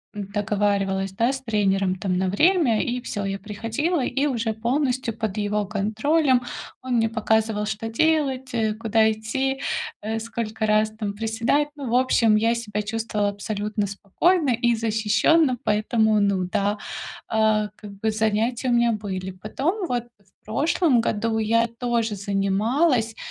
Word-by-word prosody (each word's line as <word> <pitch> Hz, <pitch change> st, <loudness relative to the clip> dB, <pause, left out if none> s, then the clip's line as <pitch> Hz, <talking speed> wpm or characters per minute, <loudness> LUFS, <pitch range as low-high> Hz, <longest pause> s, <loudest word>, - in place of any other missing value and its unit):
м, 200 Hz, -2 st, -5 dB
договаривалась, 200 Hz, -2 st, 0 dB
да, 230 Hz, +6 st, +1 dB
с 265 Hz, -1 st, -5 dB
тренером, 195 Hz, -5 st, +1 dB
там, 185 Hz, 0 st, -1 dB
на 190 Hz, 0 st, 0 dB
время. 295 Hz, -, +3 dB
И 245 Hz, 0 st, -2 dB
всё, 205 Hz, -5 st, -4 dB
я 195 Hz, 0 st, -2 dB
приходила, 230 Hz, -, -2 dB
и 270 Hz, +4 st, 0 dB
уже 235 Hz, -5 st, -1 dB
полностью 250 Hz, 0 st, -1 dB
под 220 Hz, -2 st, -3 dB
его 205 Hz, -1 st, -1 dB
контролем 245 Hz, +7 st, +1 dB, 0.4 s
он 255 Hz, -1 st, -2 dB
мне 225 Hz, -1 st, +2 dB
показывал, 220 Hz, -1 st, 0 dB
что 215 Hz, +1 st, -3 dB
делать, 270 Hz, -1 st, +1 dB
э, 220 Hz, -2 st, +1 dB
куда 220 Hz, 0 st, +2 dB
идти, 265 Hz, +5 st, -2 dB, 0.4 s
э, 220 Hz, +2 st, -2 dB
сколько 225 Hz, -1 st, -3 dB
раз 215 Hz, 0 st, +3 dB
там 215 Hz, -2 st, -5 dB
приседать. 225 Hz, +7 st, 0 dB
Ну, 275 Hz, -5 st, -5 dB
в 245 Hz, -, +2 dB
общем, 235 Hz, -4 st, +4 dB
я 230 Hz, +2 st, +2 dB
себя 210 Hz, -3 st, -3 dB
чувствовала 215 Hz, -1 st, -1 dB
абсолютно 210 Hz, +1 st, -3 dB
спокойно 275 Hz, -, +1 dB
и 240 Hz, 0 st, +2 dB
защищённо, 225 Hz, +6 st, +2 dB
поэтому, 215 Hz, 0 st, +2 dB
ну 200 Hz, -2 st, +1 dB
да, 205 Hz, +1 st, 0 dB, 0.5 s
а, 215 Hz, -1 st, +2 dB
как 210 Hz, -2 st, -11 dB
бы, 220 Hz, -, 0 dB
занятия 220 Hz, +4 st, 0 dB
у -, -, +2 dB
меня 235 Hz, -1 st, +3 dB
были. 190 Hz, -3 st, -4 dB
Потом, 275 Hz, -, -2 dB
вот, 240 Hz, -1 st, -1 dB
в 195 Hz, -1 st, -33 dB
прошлом 275 Hz, -, +2 dB
году 225 Hz, 0 st, -1 dB
я 230 Hz, +2 st, +2 dB
тоже 230 Hz, -2 st, -1 dB
занималась, 220 Hz, -, +1 dB
220 Hz, 150 wpm, -24 LUFS, 210-245 Hz, 0.5 s, общем